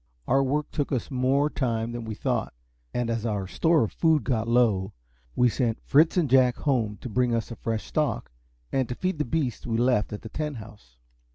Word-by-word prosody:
Our 135 +1 +4
work 145 +3 -1
took 145 - -2
us 130 -1 -2
more 135 +3 +2
time 115 -6 -1
than 120 -1 -5
we 110 -1 -5
thought; - - -2 0.4
and 120 -1 -1
as 115 -1 -2
our 105 -4 -1
store 160 - +2
of 110 - -2
food 160 -3 +2
got 115 -4 -1
low, 115 -6 +2 0.4
we 125 - +4
sent 120 -1 0
Fritz 155 +5 +4
and 170 -4 +3
Jack 130 -1 +4
home 115 -8 0
to - - -5
bring 125 +1 +1
us 115 +1 -3
a - - -5
fresh 110 0 -3
stock, 150 - -1 0.4
and 130 -3 0
to 125 - -3
feed 185 0 -2
the 150 - +1
beasts 125 -3 -2
we 115 - -1
had 115 - +1
left 125 -4 +2
at 105 +1 -7
Tent 150 -3 -3
House. 105 - -13
125 Hz, 210 wpm, -26 LUFS, 115-140 Hz, 0.4 s, Our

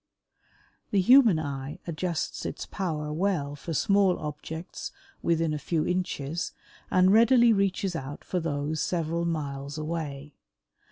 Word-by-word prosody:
The 200 - +2
human 230 -2 +7
eye 140 -2 -4
adjusts 170 0 -3
its - - -4
power 155 -6 -3
well 160 -5 0
for 155 +3 -7
small 195 +3 +3
objects 155 +3 -6 0.3
within 165 -2 +1
a 150 - -2
few 155 +2 -1
inches 175 -3 -2 0.4
and 185 +1 +5
readily 235 +1 +6
reaches 195 -2 0
out 145 -1 -6
for 180 - -2
those 150 -1 -2
several 170 -1 -1
miles 145 -3 -3
away. 150 -2 -4
165 Hz, 125 wpm, -27 LUFS, 150-185 Hz, 0.4 s, human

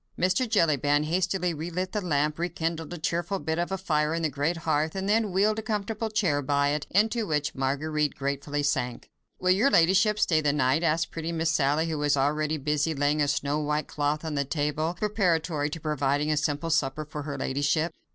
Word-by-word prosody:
Mr. 185 +7 +1
Jellyband 150 - +2
hastily 180 +1 0
relit 175 +4 -4
the 210 - -2
lamp, 150 -3 0
rekindled 165 -2 -3
a 175 - -5
cheerful 170 +4 -1
bit 160 -2 -2
of 190 +2 -2
fire 155 -4 0
in 165 - -2
the 155 - 0
great 150 +5 -1
hearth, 155 +1 0
and 190 0 -2
then 215 0 +2
wheeled 210 +4 +2
a - - -3
comfortable 220 +1 -3
chair 180 -10 +1
by 140 +1 +1
it, 145 0 -2
into 220 +3 +1
which 150 -2 -1
Marguerite 145 +3 -1
gratefully 140 +1 -2
sank. 125 -4 -2 0.3
"Will 185 - +2
your 210 +9 +4
ladyship 200 +3 +4
stay 160 -6 +2
the 145 -2 +1
night?" 135 +1 +2
asked 165 0 +1
pretty 165 0 -4
Miss 165 0 0
Sally, 150 +1 +1
who 160 -2 -2
was 145 -1 +2
already 150 +3 +1
busy 150 +2 0
laying 145 +2 +1
a 145 - +2
snow 145 +1 0
white 150 0 -1
cloth 150 +2 -1
on 160 - -3
the 140 -1 0
table, 150 +3 -1
preparatory 170 -8 0
to 165 - -6
providing 150 -1 0
a 150 - +1
simple 150 +2 -1
supper 150 -1 0
for 150 0 -6
her 145 -1 -5
ladyship. 145 +5 0
155 Hz, 200 wpm, -27 LUFS, 145-175 Hz, 0.3 s, your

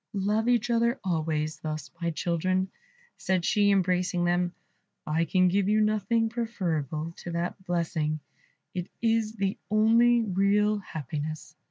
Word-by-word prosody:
"Love 210 +3 +1
each 240 0 +2
other 235 +2 +2
always 155 -3 -1
thus, 155 -2 -5
my 170 - 0
children," 185 +3 0 0.5
said 185 -2 0
she, 205 -4 +3
embracing 180 -2 +2
them; 175 0 +1 0.5
"I 160 +2 +1
can 185 +3 +3
give 195 +2 +2
you 215 +1 +3
nothing 215 +2 +2
preferable 170 - -2
to - - -8
that 175 +3 -3
blessing; 160 -3 -1 0.5
it 180 -1 -3
is 225 -1 +1
the 195 -2 -2
only 230 +2 +4
real 205 +1 +2
happiness." 155 -3 -6
185 Hz, 135 wpm, -28 LUFS, 170-215 Hz, 0.5 s, only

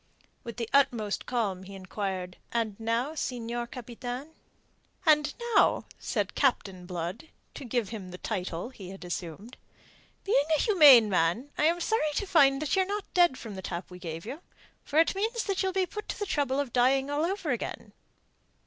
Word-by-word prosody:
With 235 -1 -8
the 230 -2 -2
utmost 235 -7 +2
calm 210 -7 -1
he 195 +1 -10
enquired: 185 -1 -4
"And 225 -3 -1
now, 230 +6 -1
Senior 240 -5 -3
Capitan?" 245 +3 -6 0.8
"And 300 -2 +4 0.2
now," - - +4
said - - -2
Captain 195 -9 0
Blood 180 - -5 0.3
to - - -8
give 240 -3 -1
him 205 -5 -7
the 180 - -8
title 185 -1 -4
he 200 -8 -10
had 190 -1 -9
assumed 175 +6 -6 0.7
"being 290 -8 +3
a - - +1
humane 295 - +8
man, 190 - +1
I 300 - +1
am 335 +2 +3
sorry 330 -7 +1
to 405 - 0
find 280 -8 +5
that 305 - 0
ye're 380 - +4
not 405 +2 -5
dead 345 -7 +4
from 220 -3 -8
the 190 - -6
tap 175 0 -5
we 180 - -10
gave 165 0 -6
you. 280 +8 -7 0.4
For 295 - -3
it 325 - +5
means 445 +4 -1
that 395 -2 -1
you'll 380 -1 +1
be 375 0 +1
put 420 +4 -8
to - - -3
the 410 - -2
trouble 285 -6 0
of 275 -4 -2
dying 265 +3 +3
all 290 +2 0
over 360 -3 -1
again." 240 - -4
245 Hz, 185 wpm, -29 LUFS, 195-305 Hz, 0.8 s, humane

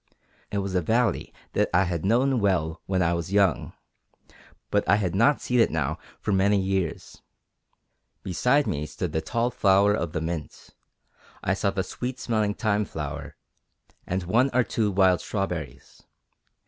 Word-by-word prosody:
It 100 - -3
was 100 -1 -2
a 90 - +2
valley 115 +8 0 0.2
that - - +1
I 90 - +5
had 85 -3 -3
known 125 +5 +2
well 85 -5 0
when 95 -1 +1
I 85 0 +2
was 85 +1 -3
young, 100 -7 +2 1.0
but - - +2
I - - +6
had 95 -5 -1
not 115 +9 +3
seen 125 0 +1
it 115 - +5
now 80 0 -2 0.2
for 105 - -2
many 100 +1 +3
years. 95 -3 -3 1.0
Beside 125 - +2
me 75 -8 -2
stood 75 +2 -4
the 80 - -1
tall 115 +9 -1
flower 100 -1 +4
of 85 -5 -2
the 80 - -1
mint; 80 -1 -6 0.7
I 95 - +1
saw 100 +1 0
the 95 -1 -1
sweet 125 +6 -5
smelling 110 -3 0
thyme 105 -2 0
flower 75 -6 -6 0.7
and 90 +1 -2
one 115 +10 +2
or 125 - +5
two 110 -2 0
wild 95 -2 +3
strawberries. 85 - -5
95 Hz, 160 wpm, -26 LUFS, 85-110 Hz, 1.0 s, I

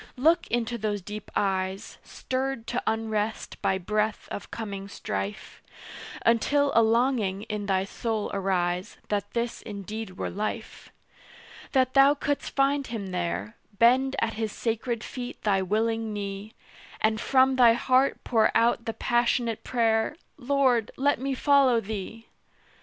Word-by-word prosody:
Look 320 +7 +3
into 235 0 -1
those 205 -2 -2
deep 210 +1 -7
eyes, 190 -1 -1
Stirred 260 -2 -3
to 240 +1 -2
unrest 220 -1 -2
by 190 - +1
breath 210 +3 -1
of 205 - -6
coming 200 -3 -6
strife, 100 - -5 0.6
Until 280 +5 +3
a 230 - +6
longing 225 -4 +1
in 210 -2 -4
thy 190 -1 +2
soul 220 +1 -3
arise 180 -2 -1
That 205 -1 -1
this 235 0 -2
indeed 210 -1 -7
were - - -3
life: 215 +2 -5 0.8
That 260 -2 +3
thou 275 +1 +6
couldst 285 0 -3
find 275 0 +2
Him 210 -5 -5
there, 90 - -3 0.2
Bend 255 +4 +4
at 225 0 0
His 220 -1 -3
sacred 230 0 -2
feet 250 -2 -6
thy 195 -2 +2
willing 220 +3 0
knee, 200 +1 -5 0.4
And 220 0 +1
from 265 0 +4
thy 240 -2 +7
heart 255 +3 +2
pour 225 -3 +3
out 230 0 +2
the 225 - -2
passionate 240 -1 0
prayer 225 +1 +1 0.2
"Lord, 255 -4 +2
let 285 +2 +2
me 270 +1 -2
follow 275 -3 +4
Thee!" 220 +1 -6
225 Hz, 140 wpm, -27 LUFS, 205-250 Hz, 0.8 s, thy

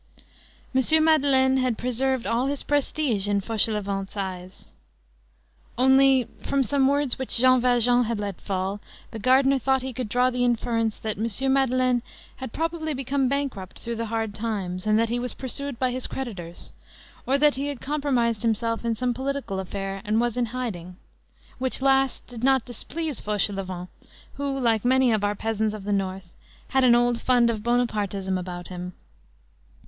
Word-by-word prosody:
M. 310 +5 +4
Madeleine 270 -4 +4
had 255 -3 0
preserved 255 +1 0
all 240 +3 0
his 285 0 -2
prestige 285 -7 +1
in 200 0 +2
Fauchelevent's 200 -2 -1
eyes. 185 -1 -6 1.1
Only, 265 0 +5
from 275 -1 +1
some 270 +2 +2
words 285 -2 +1
which 260 - 0
Jean 255 +1 +5
Valjean 245 0 +3
had 225 -1 -2
let 200 -3 -5
fall, 195 +1 -2 0.3
the 225 - -6
gardener 265 +4 +4
thought 265 0 +1
he 260 -1 -4
could 240 -2 -4
draw 250 +3 +2
the 250 0 0
inference 230 -2 0
that 215 -2 -4
M. 235 +5 +1
Madeleine 255 -2 +2 0.4
had 260 -3 -6
probably 320 0 -2
become 270 +1 0
bankrupt 265 -10 -3
through 235 0 -4
the 230 0 -3
hard 225 -1 -2
times, 205 -4 -3
and 215 0 +4
that 230 0 +2
he 240 +1 -1
was 250 0 -3
pursued 275 0 -4
by 255 0 0
his 255 0 0
creditors; 190 -10 -7 0.5
or 270 +2 +3
that 295 0 +4
he 275 +2 -3
had 285 -3 -4
compromised 260 -7 0
himself 230 0 0
in 230 -1 0
some 245 +2 -1
political 265 -6 -3
affair, 195 +1 -5
and 215 +2 +1
was 240 -1 0
in 245 -1 0
hiding; 210 -8 -5 0.6
which 260 0 0
last 270 -1 +2
did 240 -1 -9
not 265 -2 +3
displease 295 +4 -4
Fauchelevent, 195 -3 -2 0.5
who, 280 0 -3
like 230 -4 +2
many 260 0 +4
of 215 -2 +1
our 205 0 +1
peasants 220 0 -1
of 210 - -8
the 205 +1 -1
North, 190 -2 -3 0.4
had 265 -1 +2
an 240 -2 +6
old 240 0 +2
fund 240 -2 +4
of 220 -2 -4
Bonapartism 210 -5 0
about 175 -1 -5
him. 180 0 -6
240 Hz, 170 wpm, -25 LUFS, 210-265 Hz, 1.1 s, an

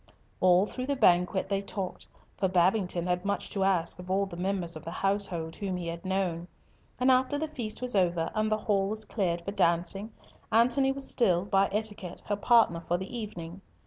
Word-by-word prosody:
All 185 +1 +5
through 255 +4 -5
the 280 - 0
banquet 180 -4 +3
they 195 0 0
talked, 195 -2 -5 0.3
for 190 - 0
Babington 180 -1 +2
had 180 0 0
much 200 0 -2
to 195 - 0
ask 180 -3 +1
of 180 0 -9
all 195 +1 +2
the 190 - -9
members 180 -2 -1
of 155 - -8
the - - -6
household 185 -3 -2
whom 190 -3 -3
he 175 - -5
had 170 0 -5
known. 185 -3 -1 0.5
And 255 +1 +4
after 260 +3 +2
the 315 +2 -2
feast 240 -5 -5
was 250 -3 0
over 175 -3 +1
and 215 0 0
the 215 - +3
hall 200 -2 +1
was 215 +1 -3
cleared 175 -6 -1
for 200 - -3
dancing, 195 +3 +1 0.4
Antony 250 +4 +4
was 270 0 -4
still, 185 -6 +2
by 195 0 +2
etiquette, 205 -4 -4
her 205 - +2
partner 205 -6 +3
for 175 - +1
the 190 +6 -7
evening. 190 -5 -6
195 Hz, 200 wpm, -29 LUFS, 175-215 Hz, 0.5 s, All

